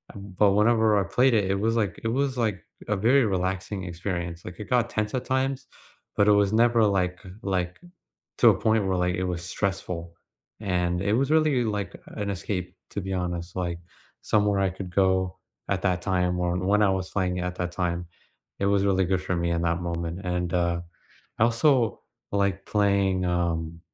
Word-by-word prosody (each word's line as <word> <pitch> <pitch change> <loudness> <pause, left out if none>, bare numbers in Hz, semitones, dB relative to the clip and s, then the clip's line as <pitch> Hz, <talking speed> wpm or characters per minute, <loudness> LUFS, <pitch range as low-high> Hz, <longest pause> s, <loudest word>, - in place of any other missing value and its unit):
but 100 0 +1
whenever 110 0 +4
I - - +1
played 130 +5 +3
it, 105 -3 +3
it - - +2
was 115 +2 +1
like 105 -5 -1
it - - -1
was 135 +2 0
like 110 -6 -1 0.2
a 105 - +1
very 120 +6 +4
relaxing 95 0 -2
experience. 85 -1 -4
Like, 90 -1 -9
it 105 - -7
got 120 -1 +2
tense 105 +1 -2
at 130 - -2
times, 135 +1 -1 0.5
but 100 - +3
it 105 - +7
was 100 0 +3
never, 115 0 +4
like 90 -3 0
uh, - - -9
like, 90 -2 -2 0.6
to - - +7
a - - +3
point 110 -1 +2
where, 95 -1 +1
like, 90 0 +1
it 95 - -2
was 90 -1 -3
stressful, 90 -3 -3 0.5
and 90 -3 0
it 100 - +1
was 135 +4 +1
really 155 -5 +3
like 105 -3 -3
an 105 -1 -4
escape, 90 -1 -4
to - - -3
be 95 0 -5
honest, 90 -1 -3
like, 85 -2 -2 0.4
somewhere 105 -1 +2
I 95 -1 +2
could 95 -1 -8
go 95 -1 +2 0.3
at 95 -2 -1
that 90 -2 0
time, 90 -2 0
or 90 0 0
when 100 +3 +2
I 100 - +4
was 95 -1 -2
playing 90 -2 -1
at 90 0 -3
that 90 0 -3
time. 85 -1 -2 0.5
It 100 - +1
was 100 0 +2
really 95 -2 +2
good 95 0 0
for 90 - -2
me 85 0 0
in 85 0 0
that 85 0 0
moment 85 +1 -3
and, 90 -1 -2
uh, 85 -1 +1 0.6
I 110 - +5
also 120 0 +2 0.3
like 100 -1 0
playing, 100 -2 +2
um 85 -2 -1
95 Hz, 195 wpm, -26 LUFS, 90-105 Hz, 0.6 s, it